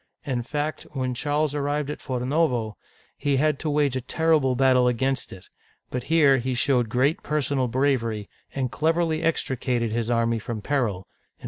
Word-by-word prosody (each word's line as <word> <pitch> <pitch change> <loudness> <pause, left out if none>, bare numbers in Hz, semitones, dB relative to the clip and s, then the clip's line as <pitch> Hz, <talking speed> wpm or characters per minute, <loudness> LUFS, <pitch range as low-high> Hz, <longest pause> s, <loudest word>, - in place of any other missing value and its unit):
In 130 -4 -1
fact, 150 +5 -3
when 130 -2 -2
Charles 145 +3 0
arrived 145 0 -1
at - - -6
Forno'vo, 125 -3 0 0.4
he 140 -2 0
had 150 0 +1
to 155 - -2
wage 145 -3 +1
a 130 - -1
terrible 150 -1 +2
battle 130 -1 +4
against 130 +2 0
it; 95 -1 -11 0.5
but 125 -1 -3
here 145 -5 +4
he 130 +1 -2
showed 125 -3 +1
great 130 +7 +1
personal 140 -3 0
bravery, 115 -5 0 0.3
and 130 -3 -1
cleverly 160 +4 +1
extricated 125 -7 0
his 115 0 -1
army 115 -1 +1
from 110 +1 -5
peril 105 -6 -1 0.3
(149S). - - -42
130 Hz, 160 wpm, -25 LUFS, 120-150 Hz, 0.5 s, battle